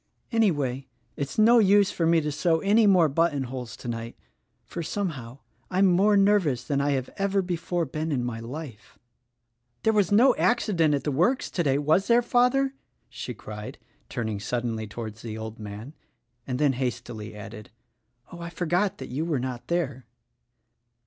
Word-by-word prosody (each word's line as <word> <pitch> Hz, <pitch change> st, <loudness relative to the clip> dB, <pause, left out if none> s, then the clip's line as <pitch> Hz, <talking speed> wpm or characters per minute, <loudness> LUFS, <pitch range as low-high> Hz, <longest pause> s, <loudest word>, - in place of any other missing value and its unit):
Anyway, 145 Hz, -, +1 dB, 0.3 s
it's 140 Hz, -1 st, -4 dB
no 230 Hz, +2 st, +6 dB
use 200 Hz, -1 st, +5 dB
for 165 Hz, -, 0 dB
me 165 Hz, 0 st, +4 dB
to 150 Hz, -1 st, -2 dB
sew 160 Hz, +2 st, +1 dB
any 210 Hz, +2 st, +4 dB
more 180 Hz, -5 st, +5 dB
button 150 Hz, -1 st, +1 dB
holes 125 Hz, -3 st, -7 dB
tonight; 115 Hz, -1 st, -6 dB, 0.5 s
for, 170 Hz, -, -6 dB
somehow, 150 Hz, -, -4 dB, 0.3 s
I'm 190 Hz, +2 st, +3 dB
more 195 Hz, +3 st, +4 dB
nervous 195 Hz, -, +3 dB
than 140 Hz, +2 st, 0 dB
I 145 Hz, 0 st, +1 dB
have 130 Hz, -2 st, -3 dB
ever 195 Hz, 0 st, +1 dB
before 175 Hz, -1 st, -2 dB
been 155 Hz, +3 st, -3 dB
in 130 Hz, -4 st, 0 dB
my 120 Hz, -2 st, -4 dB
life." 120 Hz, -2 st, -9 dB, 0.9 s
"There 220 Hz, -, +3 dB
was 205 Hz, -4 st, +2 dB
no 240 Hz, +5 st, +6 dB
accident 170 Hz, -10 st, +2 dB
at 140 Hz, -, -3 dB
the 150 Hz, -, -1 dB
works 180 Hz, -, +1 dB
today, 145 Hz, -7 st, +1 dB
was 155 Hz, +7 st, +2 dB
there, 240 Hz, +1 st, +4 dB
father?" 250 Hz, +3 st, +2 dB, 0.4 s
she 120 Hz, 0 st, -6 dB
cried, 105 Hz, 0 st, -8 dB, 0.3 s
turning 110 Hz, -3 st, -3 dB
suddenly 115 Hz, 0 st, -3 dB
towards 110 Hz, 0 st, -7 dB
the 110 Hz, -2 st, -6 dB
old 110 Hz, 0 st, -7 dB
man 105 Hz, +3 st, -7 dB
• -, -, -26 dB, 0.3 s
— 120 Hz, 0 st, -45 dB
and 125 Hz, -2 st, -2 dB
then 145 Hz, -1 st, +3 dB
hastily 120 Hz, -4 st, -4 dB
added, 105 Hz, 0 st, -9 dB, 0.6 s
"I 170 Hz, -1 st, -7 dB
forgot 175 Hz, +3 st, 0 dB
that 130 Hz, -, -8 dB
you 135 Hz, +6 st, -2 dB
were 160 Hz, -5 st, -1 dB
not 125 Hz, -1 st, -5 dB
there." 140 Hz, -8 st, -2 dB
145 Hz, 170 wpm, -26 LUFS, 120-190 Hz, 0.9 s, no